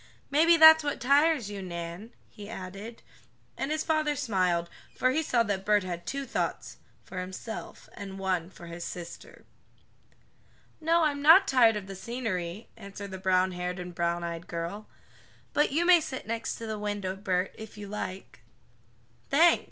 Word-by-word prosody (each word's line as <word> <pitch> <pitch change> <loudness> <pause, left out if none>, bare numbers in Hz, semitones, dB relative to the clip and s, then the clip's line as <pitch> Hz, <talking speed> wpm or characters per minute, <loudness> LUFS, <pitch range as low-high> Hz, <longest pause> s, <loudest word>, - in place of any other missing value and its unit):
Maybe 330 +4 +5
that's 315 0 +9
what 290 -1 -2
tires 280 -3 +3
you, 200 -1 -6
Nan," 170 +4 -6 0.2
he 205 -2 -11
added, 200 +3 -8 0.5
and 270 - -3
his 310 0 -1
father 310 -2 +1
smiled, 185 -10 0 0.3
for 255 - +2
he 310 +5 +1
saw 245 -6 +2
that 200 -3 -2
Bert 210 0 +3
had 175 -1 -6
two 275 +5 -3
thoughts - - -3 0.3
for 185 - -7
himself, 190 +5 -8
and 195 -1 -8
one 185 -3 -1
for 180 -2 -13
his 170 0 -7
sister. 175 -1 -9 1.3
"No, 330 +1 +3
I'm 290 -2 0
not 335 +7 +8
tired 235 -4 +5
of 205 -2 -4
the 195 0 -8
scenery," 200 -3 -4
answered 200 -2 -9
the 190 - -6
brownhaired 185 -1 0
and 180 0 -7
browneyed 170 0 -2
girl, 170 +5 -5 0.7
"but 295 - +2
you 325 +5 +1
may 350 -2 +7
sit 275 -4 -6
next 230 +1 -3
the 220 -2 -5
window, 205 -2 -3
Bert, 190 -1 -1
if 220 -1 -10
you 205 -1 -7
like." 195 -5 -6 0.9
"Thanks!" 335 +5 +5
205 Hz, 160 wpm, -28 LUFS, 185-275 Hz, 1.3 s, that's